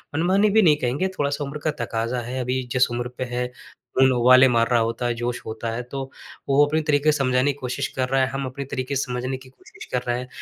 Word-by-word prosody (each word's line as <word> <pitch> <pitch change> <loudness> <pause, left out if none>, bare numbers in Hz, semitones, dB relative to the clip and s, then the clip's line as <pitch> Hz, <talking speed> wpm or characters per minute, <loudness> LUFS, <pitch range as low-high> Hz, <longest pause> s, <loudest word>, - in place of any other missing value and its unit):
मनमानी 190 +6 +3
भी 220 +2 +5
नहीं 160 -7 +5
कहेंगे, 130 +10 0
थोड़ा-सा 145 -6 -2
उम्र 140 +2 -5
का 155 - +1
तकाज़ा 115 +2 -2
है। 125 +2 -5
अभी 130 +1 -1
जिस 125 0 +3
उम्र 120 +1 -2
पे - - -2
है, 125 0 -2 0.5
खून 130 0 +6
उबाले 130 +2 +6
मार 115 -1 +2
रहा 120 -2 +3
होता 115 +2 -2
है, 120 - 0
जोश 120 +1 -3
होता 110 +1 -4
है, 115 +2 -3
तो 135 +2 -6 0.4
वो 140 +2 +5
अपने 155 +2 0
तरीके 150 0 +3
से 150 - 0
समझाने 130 0 +2
की 140 - -18
कोशिश 125 -2 -2
कर 130 -1 +1
रहा 135 0 +2
है, 130 - +2
हम 135 0 -3
अपने 135 +2 -6
तरीके 130 +1 -3
से 135 - +1
समझने 125 +1 -3
की 130 0 -15
कोशिश 130 - -14
कर 125 - +1
रहे 120 0 +1
हैं। 125 - -7
130 Hz, 255 wpm, -23 LUFS, 125-140 Hz, 0.5 s, खून